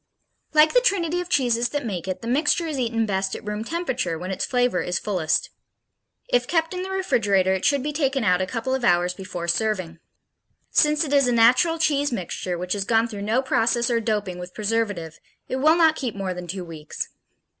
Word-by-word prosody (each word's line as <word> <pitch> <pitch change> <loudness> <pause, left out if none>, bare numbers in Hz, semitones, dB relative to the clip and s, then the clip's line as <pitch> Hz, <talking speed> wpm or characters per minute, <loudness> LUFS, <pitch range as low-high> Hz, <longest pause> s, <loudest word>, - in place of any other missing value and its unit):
Like 305 +1 +6
the - - +5
trinity 355 -7 +1
of 355 - -8
cheeses 245 -6 +1
that 290 -3 -3
make 190 -5 -4
it, 185 +4 -4
the - - -5
mixture 300 +6 +1
is 305 -4 -3
eaten 230 -2 0
best 190 -2 -1
at - - -9
room 210 +1 -3
temperature, 255 - -2
when 180 +3 -5
its 190 - -2
flavor 245 -7 +1
is 180 0 -2
fullest. 175 -7 -1 0.8
If - - +1
kept 325 0 0
in 365 - -3
the 375 - -5
refrigerator, 205 - +1
it 190 - -2
should 280 -2 +2
be 300 +1 -3
taken 275 -4 0
out 180 -3 +3
a 185 - -1
couple 240 +4 -3
of 265 -2 -1
hours 175 -4 +3
before 180 -2 -6
serving. 185 -3 -1 0.7
Since 300 +1 +3
it 290 -2 -3
is 280 -2 +4
a - - +2
natural 250 +8 +4
cheese 290 -3 +1
mixture, 180 -3 -3
which 180 +1 -2
has 200 -1 -1
gone 225 +2 +2
through 205 -3 -7
no 225 +6 +1
process 235 -1 +1
or 230 - +2
doping 210 -5 -2
with 180 0 -9
preservative, 205 -7 -2 0.3
it 260 - -2
will 310 +4 +4
not 325 -2 +4
keep 250 -8 -4
more 195 -2 -3
than 180 0 -7
two 180 +1 -5
weeks. 155 -2 -6
230 Hz, 210 wpm, -23 LUFS, 185-285 Hz, 0.8 s, Like